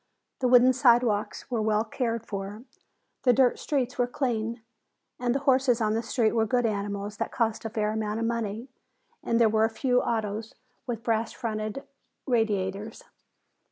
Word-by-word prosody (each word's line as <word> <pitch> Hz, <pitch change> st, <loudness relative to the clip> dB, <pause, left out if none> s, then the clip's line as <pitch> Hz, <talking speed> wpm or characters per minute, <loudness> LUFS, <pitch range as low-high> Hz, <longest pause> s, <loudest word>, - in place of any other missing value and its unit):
The 255 Hz, -, +1 dB
wooden 250 Hz, +1 st, +6 dB
sidewalks 240 Hz, -2 st, +2 dB
were 235 Hz, -3 st, 0 dB
well 215 Hz, 0 st, +2 dB
cared 230 Hz, 0 st, -3 dB
for, 200 Hz, +2 st, -6 dB, 0.6 s
the 250 Hz, -, +4 dB
dirt 250 Hz, 0 st, +3 dB
streets 255 Hz, -4 st, -2 dB
were 245 Hz, -, +3 dB
clean, 235 Hz, -3 st, -2 dB, 0.6 s
the 245 Hz, +1 st, +1 dB
horses 265 Hz, -3 st, +3 dB
on 215 Hz, -1 st, +1 dB
the 225 Hz, -, 0 dB
streets 230 Hz, -1 st, +1 dB
were 225 Hz, -1 st, +2 dB
good 245 Hz, +1 st, +1 dB
animals 205 Hz, -1 st, -3 dB
that -, -, -3 dB
cost 225 Hz, -2 st, -1 dB
a -, -, -2 dB
fair 215 Hz, -1 st, -1 dB
amount 215 Hz, 0 st, -2 dB
of 230 Hz, -, -1 dB
money, 230 Hz, 0 st, -2 dB, 0.5 s
and 230 Hz, -, 0 dB
there 230 Hz, -, +6 dB
were 220 Hz, 0 st, +3 dB
a -, -, 0 dB
few 250 Hz, +2 st, +1 dB
autos 220 Hz, -1 st, -3 dB, 0.3 s
with 230 Hz, -2 st, -4 dB
brass 225 Hz, -1 st, 0 dB
fronted 215 Hz, +1 st, -4 dB, 0.4 s
radiators. 215 Hz, -3 st, -1 dB
225 Hz, 160 wpm, -27 LUFS, 215-245 Hz, 0.6 s, wooden